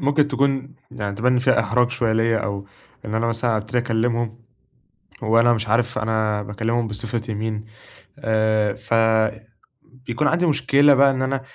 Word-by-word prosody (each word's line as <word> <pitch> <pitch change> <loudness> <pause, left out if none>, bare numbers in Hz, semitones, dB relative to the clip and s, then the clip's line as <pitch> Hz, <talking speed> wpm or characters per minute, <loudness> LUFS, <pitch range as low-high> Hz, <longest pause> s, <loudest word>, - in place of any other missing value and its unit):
ممكن 145 +1 +2
تكون 135 0 -1 0.2
يعني 100 -1 -5
تبان 125 +3 +2
إن 125 - +2
فيها 130 +1 +3
إحراج 120 +3 +1
شوية 115 -3 0
ليَّ 115 +1 +2
أو 100 -2 -4 0.4
إن 110 0 -5
أنا 115 +1 0
مثلًا 115 0 0
أبتدي 110 +4 -2
أكلّمهم 115 0 -1 0.8
وأنا 115 +2 +4
مش 110 -1 -2
عارف 120 +1 +1
أنا 110 -1 -1
باكلّمهم 110 +4 -2
بصفتي 110 +1 -4
مين 110 0 -4 0.6
آآ 110 -2 +1
فبيكون 115 +4 -2
عندي 175 +3 +2
مشكلة 145 -2 +4
بقى 140 0 +5
إن 130 -1 -2
أنا 135 0 -1
115 Hz, 150 wpm, -21 LUFS, 110-125 Hz, 0.8 s, بقى